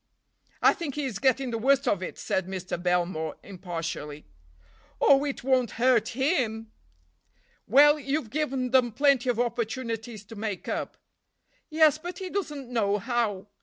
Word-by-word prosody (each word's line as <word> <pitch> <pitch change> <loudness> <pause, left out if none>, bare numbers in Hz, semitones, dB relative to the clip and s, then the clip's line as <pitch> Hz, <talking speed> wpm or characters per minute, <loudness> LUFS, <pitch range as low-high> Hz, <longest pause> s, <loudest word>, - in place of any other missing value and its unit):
"I - - +7
think 300 -6 -5
he 295 -1 -2
is 250 -6 -4
getting 260 -1 +1
the 230 - -2
worst 275 +3 +2
of 200 -6 +1
it," 185 - -6
said 190 -1 -2
Mr. 185 -2 -5
Belmore 175 -3 -1
impartially. 165 -6 -6 0.7
"Oh, 275 0 +5
it 285 -4 -4
won't 255 -3 +1
hurt 240 -1 +2
him." 235 -7 0 1.0
"Well, 295 +6 +6
you've 275 -5 -2
given 265 -4 -1
them 250 -3 +3
plenty 275 -1 +3
of 240 -2 0
opportunities 230 -2 -3
to 225 - -11
make 205 -3 -5
up." - - -4 0.7
"Yes, 310 -1 +4
but 350 +2 -7
he 375 -2 -6
doesn't 295 -9 -4
know 205 -4 +1
how." 210 -3 -2
240 Hz, 150 wpm, -27 LUFS, 205-275 Hz, 1.0 s, I